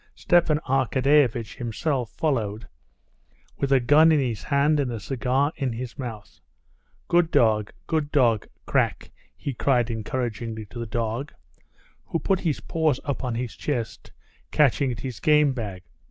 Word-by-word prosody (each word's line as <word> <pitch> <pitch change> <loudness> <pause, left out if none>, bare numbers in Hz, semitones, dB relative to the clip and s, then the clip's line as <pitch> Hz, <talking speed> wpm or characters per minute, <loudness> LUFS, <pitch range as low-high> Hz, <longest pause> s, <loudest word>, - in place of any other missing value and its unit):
Stepan 170 -3 +3
Arkadyevitch 130 -3 +2
himself 125 +1 -2
followed 115 -8 -2 0.9
with 140 - -1
a 135 - +6
gun 150 +6 +5
in 155 - +4
his 120 -7 -2
hand 140 - +2
and 135 -3 0
a 115 - -4
cigar 135 +5 0
in 135 -5 -1
his 120 +1 -6
mouth. 115 -5 -7 0.7
"Good 175 -1 +3
dog, 105 -6 +2
good 155 -2 -1
dog, 120 -7 +2 0.2
Krak!" - - 0 0.3
he 140 - -4
cried 120 -1 +1
encouragingly 115 -1 -4
to 120 - -7
the 115 - -4
dog, 115 +4 -3 0.7
who - - -2
put 190 +2 0
his 160 -6 -1
paws 155 -5 0
up 140 -1 -3
on 125 -2 -2
his 120 -3 -4
chest, 120 -5 -4 0.4
catching 140 -2 +3
at 120 -1 -6
his 130 -4 -6
game 150 -2 +4
bag. 100 -7 -6
130 Hz, 150 wpm, -25 LUFS, 115-145 Hz, 0.9 s, a